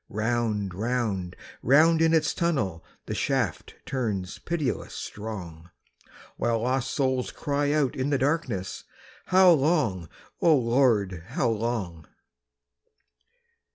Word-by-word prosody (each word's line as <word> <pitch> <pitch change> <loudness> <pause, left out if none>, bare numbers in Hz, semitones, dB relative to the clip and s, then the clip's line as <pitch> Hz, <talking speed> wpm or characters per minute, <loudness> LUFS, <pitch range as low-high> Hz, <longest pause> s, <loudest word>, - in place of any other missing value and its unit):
Round, 110 -3 -1
round, 105 -4 -2 0.3
round 160 +5 +5
in 165 0 +4
its 160 -1 +2
tunnel 110 - -1 0.2
The - - -4
shaft - - -1
turns 110 -9 -3
pitiless 160 -6 -3
strong, 90 -6 -7 0.7
While 115 -1 0
lost 130 +1 0
souls 130 -3 0
cry 145 -1 -1
out 145 -4 +1
in 130 +2 -1
the 140 - +2
darkness: 130 - -1 0.4
"How 185 -1 +6
long, 135 - +1 0.3
O 165 -4 +5
Lord, 115 -8 +1
how 120 0 0
long?" 105 -8 -3
120 Hz, 110 wpm, -26 LUFS, 100-145 Hz, 0.7 s, How